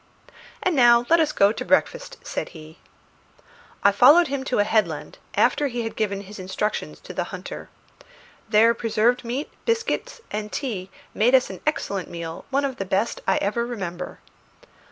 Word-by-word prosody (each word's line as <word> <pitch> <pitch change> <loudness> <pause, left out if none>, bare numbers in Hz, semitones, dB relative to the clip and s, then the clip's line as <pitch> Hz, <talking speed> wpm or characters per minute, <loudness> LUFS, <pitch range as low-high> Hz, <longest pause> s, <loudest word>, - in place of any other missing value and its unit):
"And 365 -3 +1
now 240 -2 +6
let 335 - +6
us 310 -2 +2
go 200 -5 +4
to - - -5
breakfast," - - 0
said - - -4
he. 155 +1 -13 1.0
I 200 - +6
followed 290 - +6
him 275 -1 -2
to 260 - -1
a 205 - +4
headland, 215 +1 -1 0.2
after 290 - +3
he 240 -2 -3
had 225 - -5
given 200 -2 -1
his 205 +1 -11
instructions 190 +3 -3
to - - -9
the - - -2
hunter. - - -8 0.8
There 225 +2 +5
preserved 235 +2 +1
meat, 250 +5 -4
biscuit, 470 +2 -1
and 210 0 -4
tea 205 -9 -4 0.2
made 240 +5 +4
us 255 - +3
an - - -9
excellent 200 -11 -1
meal, 170 -1 -7
one 280 +1 +1
of 265 -2 -4
the - - -2
best 195 +4 -1
I 190 - +3
ever 215 +4 0
remember. 180 -7 -5
230 Hz, 170 wpm, -24 LUFS, 200-270 Hz, 1.0 s, now